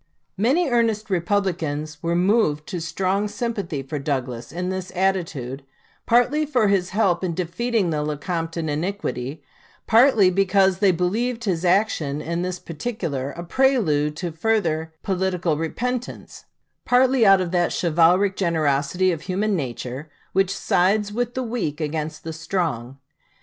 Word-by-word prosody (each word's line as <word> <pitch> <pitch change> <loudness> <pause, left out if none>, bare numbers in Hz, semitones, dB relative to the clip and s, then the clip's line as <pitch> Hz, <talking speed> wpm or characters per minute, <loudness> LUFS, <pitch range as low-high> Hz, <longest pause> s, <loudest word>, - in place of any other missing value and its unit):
Many 275 - +2
earnest 225 -4 +1
Republicans 170 -5 -1
were 170 0 0
moved 180 -5 +2
to 175 - -4
strong 190 +5 -1
sympathy 205 - -3
for 145 +2 -5
Douglas 130 -4 -3
in 180 +3 -3
this 185 -1 -4
attitude, 165 -9 -1 0.4
partly 245 +6 +3
for 250 -8 +2
his 185 -2 +1
help 190 -3 +1
in 175 -3 -1
defeating 190 +3 -1
the 150 -1 -1
Lecompton 165 +2 -3
iniquity, 150 - -3 0.4
partly 225 -5 +5
because 195 0 +3
they 200 -1 +4
believed 225 +8 -1
his 185 -6 -1
action 175 -6 +1
in 170 +3 -3
this 180 0 -2
particular 165 - -4
a 170 - -7
prelude 170 - +2
to 175 +1 -4
further 160 -4 0
political 185 -3 0
repentance, 245 +11 -4 0.4
partly 255 0 +4
out 195 -2 +7
of 180 -2 -2
that 175 -2 +1
chivalric 175 +4 +3
generosity 160 0 +1
of 165 -3 -4
human 200 +3 -1
nature 130 0 -5 0.2
which 195 0 +2
sides 205 +3 +1
with 245 +2 -2
the 260 - -1
weak 220 -11 -3
against 155 0 -3
the 160 - -5
strong. 155 -7 -3
180 Hz, 140 wpm, -23 LUFS, 155-205 Hz, 0.4 s, out